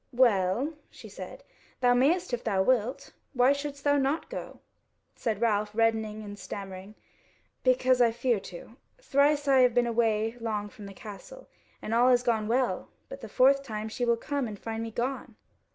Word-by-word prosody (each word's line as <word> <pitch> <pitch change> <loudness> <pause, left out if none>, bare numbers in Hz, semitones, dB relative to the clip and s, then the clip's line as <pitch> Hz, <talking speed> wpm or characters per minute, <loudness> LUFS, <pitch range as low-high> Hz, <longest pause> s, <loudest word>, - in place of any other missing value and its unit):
"Well," 235 - +2 0.2
she - - -13
said, - - -10 0.4
"thou 245 -1 +4
mayest 295 +6 +2
if 240 - -2
thou 195 -4 +1
wilt; 255 +4 0 0.2
why 250 +2 +5
shouldst 280 0 -6
thou 285 0 +3
not 280 - -1
go?" - - -7 0.5
Said 220 -4 -2
Ralph, 210 -2 0
reddening 220 -1 0
and 205 -1 -9
stammering: 195 +1 -8 0.7
"Because 255 0 +3
I 235 - +6
fear 235 -1 0
to; 190 +6 -11 0.2
thrice 290 - +2
have 275 - +3
I 255 -1 +7
been 245 0 +1
away 225 -1 0
long 210 -3 -3
from 205 -1 -11
the 195 - -11
castle 220 - -11 0.4
and 220 - -3
all 240 +2 +5
has 245 -1 +4
gone 225 -3 0
well; 240 -5 0 0.2
but 275 - -9
the 225 - -8
fourth 270 +4 +4
time 220 -5 -5
she 245 - -4
will 235 -1 +2
come 280 +1 -2
and 210 -2 -7
find 225 +2 -5
me 230 - -4
gone." 250 +4 -4
235 Hz, 180 wpm, -28 LUFS, 215-265 Hz, 0.7 s, I